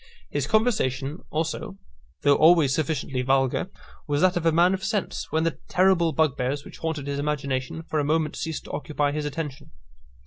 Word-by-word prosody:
His - - -1
conversation 160 - +1
also, 160 +4 -3 0.5
though 145 - +6
always 155 -2 +5
sufficiently 150 -4 -1
vulgar, 135 +6 +1 0.4
was 145 0 0
that 185 0 +4
of 170 -1 0
a - - +5
man 175 +3 +4
of 190 0 -3
sense, 205 -1 -2
when 160 0 +1
the 165 -1 -1
terrible 180 -3 +3
bugbears 140 -2 0
which - - -12
haunted 160 -4 -3
his 140 0 -3
imagination 140 0 -2
for 155 -1 -2
a - - +1
moment 155 +1 0
ceased 160 -2 -4
to - - -10
occupy 145 -1 -1
his 150 0 -3
attention. 145 -1 -5
155 Hz, 175 wpm, -25 LUFS, 140-165 Hz, 0.5 s, though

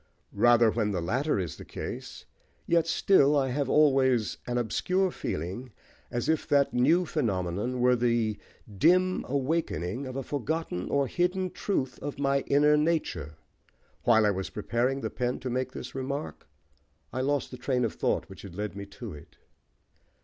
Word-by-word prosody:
Even 120 +1 +5
when 110 -2 0
the 90 - -1
latter 125 - 0
is 90 -6 -3
the - - -9
case, - - -7 0.4
yet 170 -1 +2
still 150 -4 +4
I 135 -2 +1
have 135 +1 -1
always 130 -6 +3
an 125 0 -1
obscure 185 - 0
feeling, 100 - -5 0.4
as 120 0 -2
if 160 -1 +1
that 140 -1 +3
new 155 +9 +3
phenomenon 105 - -1
were 125 0 +5
the 115 -3 +1 0.4
dim 185 +3 +4
awaking 135 - -1
of 130 - -7
a 135 - -3
forgotten 145 - -3
or 140 -1 +2
hidden 180 +5 0
truth 135 -10 -2
of 145 - -5
my 140 0 +2
inner 150 +1 +5
nature. 150 - -1 0.7
While 110 -2 +4
I 105 - +4
was 95 -1 -3
preparing 120 +5 -1
the - - -3
pen 125 0 -1
to 130 - -3
make 130 +1 -1
this - - -8
remark, 135 - -5 0.7
I 130 - -1
lost 140 +1 0
the 125 - -7
train 125 -1 0
of 115 - -2
thought - - -1
which - - -12
had 95 -4 -10
led 105 0 -4
me 100 0 -7
to 105 +1 -8
it." 75 - -14
130 Hz, 165 wpm, -28 LUFS, 110-145 Hz, 0.7 s, Even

